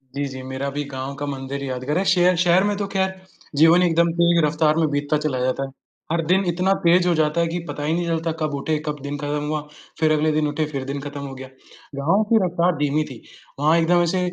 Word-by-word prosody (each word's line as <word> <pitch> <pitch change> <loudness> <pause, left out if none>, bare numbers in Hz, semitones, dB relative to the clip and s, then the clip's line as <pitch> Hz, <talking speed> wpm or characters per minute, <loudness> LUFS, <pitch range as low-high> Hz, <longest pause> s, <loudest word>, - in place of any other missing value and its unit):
जी, 140 0 -1
जी, 130 -1 -7
मेरा 130 +1 -4
भी 145 +1 -3
गाँव 135 +1 -5
का 145 +1 -4
मंदिर 140 0 -5
यादगार 130 +3 -2
है, 190 - +1
शहर 180 0 +4
शहर 180 +1 +4
में 205 0 0
तो 200 -1 -2
खैर 190 -1 -1 0.4
जीवन 165 +4 +6
एकदम 170 -1 +3
तेज़ 170 -2 +4
रफ़्तार 155 0 +2
में 160 -2 +2
बीतता 145 +1 0
चला 130 -4 0
जाता 130 +2 0
है। 135 - -5 0.4
हर 165 -1 0
दिन 185 +4 +3
इतना 180 +3 +2
तेज़ 175 +1 +4
हो 175 - +3
जाता 155 +1 +1
है 170 - +1
कि 170 +2 -3
पता 145 - -5
ही 155 +2 0
नहीं 175 0 -1
चलता 165 0 -1
कब 155 -2 -1
उठे, 155 +3 -1
कब 150 -1 -3
दिन 145 0 -4
खत्म 145 +1 -2
हुआ, 150 0 -1 0.4
फिर 155 -1 +3
अगले 155 0 +2
दिन 150 0 +1
उठे, 150 +1 -1
फिर 135 -2 -3
दिन 140 +1 -4
खत्म 145 0 -7
हो 135 - -7
गया। 130 0 -9 0.5
गाँव 165 +10 +2
की 230 - +5
रफ़्तार 175 0 +1
धीमी 145 +1 +1
थी, 130 -6 -10 0.4
वहाँ 155 +3 +4
एकदम 175 +1 +3
ऐसे 175 +2 0
155 Hz, 245 wpm, -22 LUFS, 145-170 Hz, 0.5 s, जीवन